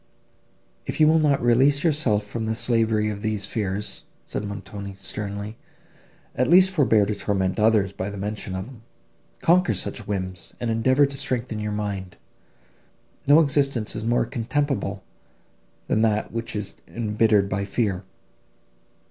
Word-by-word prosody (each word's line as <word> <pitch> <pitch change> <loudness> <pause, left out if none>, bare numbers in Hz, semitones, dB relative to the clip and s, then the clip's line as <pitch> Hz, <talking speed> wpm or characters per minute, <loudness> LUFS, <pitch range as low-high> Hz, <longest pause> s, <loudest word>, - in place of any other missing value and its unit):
"If - - -4
you 155 - +6
will 160 +1 +5
not 145 -5 +2
release 135 +4 +4
yourself 140 -10 +2
from 110 +2 -4
the 110 0 -1
slavery 110 -2 +1
of 100 -1 -6
these 105 -2 -1
fears," 100 -1 -3 0.2
said - - -4
Montoni, 100 -1 -7
sternly, 100 +3 -5 0.8
"at 125 - +1
least 185 +2 +7
forbear 125 - +3
to 105 - -1
torment 100 -1 -1
others 105 -3 +3
by 95 0 -4
the 100 - -7
mention 105 -1 -4
of 95 0 -4
them. 125 -2 -13 0.6
Conquer 180 +2 +4
such 110 - -3
whims, 95 -3 -4
and 120 -1 -1
endeavour 130 +5 +3
to 140 0 -5
strengthen 125 -4 -2
your 105 0 -3
mind. 100 -3 -4 1.1
No 145 +3 +7
existence 140 -6 +1
is 110 - -4
more 120 +1 +2
contemptible 125 -4 -2 0.8
than 110 - +1
that, 110 -1 +1
which 115 0 -4
is 105 -2 -4
embittered 105 -2 +2
by 100 0 -2
fear." 100 -2 -1
110 Hz, 150 wpm, -24 LUFS, 100-125 Hz, 1.1 s, least